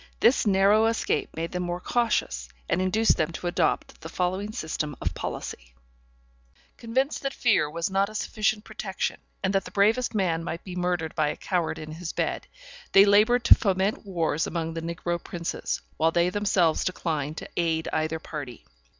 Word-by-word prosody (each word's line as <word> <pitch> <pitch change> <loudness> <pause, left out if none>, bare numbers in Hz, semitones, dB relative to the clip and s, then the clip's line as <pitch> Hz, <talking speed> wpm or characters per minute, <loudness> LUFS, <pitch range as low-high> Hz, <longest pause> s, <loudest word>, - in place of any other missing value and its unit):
This 235 -2 +4
narrow 205 +3 +5
escape 225 0 0
made 165 +1 -3
them 180 - -2
more 175 0 -2
cautious, 180 - 0 0.2
and 185 - +1
induced 215 +5 +3
them 160 +1 0
to 175 - -7
adopt 175 -2 0
the 160 - -7
following 185 +4 -1
system 155 -6 -3
of - - -2
policy: - - -6 1.0
Convinced 260 +5 -1
that 275 0 -3
fear 205 -11 +3
was 170 +5 -2
not 195 +1 +2
a 215 - -11
sufficient 215 0 0
protection, 215 -3 -4 0.2
and 195 0 +1
that 195 -1 +2
the - - -9
bravest 220 +4 +2
man 170 -5 +1
might 170 0 -5
be 180 -2 -7
murdered 175 -3 -1
by 155 -2 +1
a - - -2
coward 175 -3 -1
in 155 -1 -7
his 165 +1 -6
bed, - - -2 0.5
they 195 +1 +9
labored 215 +4 +5
to - - +9
foment 195 0 0
wars 165 -6 -1
among 165 -1 -3
the 165 - -4
negro 170 +1 -3
princes, 170 -1 -3 0.2
while 160 - +3
they 170 +2 +2
themselves 185 -5 +2
declined 155 -4 -2
to - - -7
aid 165 -1 0
either 155 +1 0
party. 145 -7 -8
180 Hz, 175 wpm, -26 LUFS, 160-205 Hz, 1.0 s, they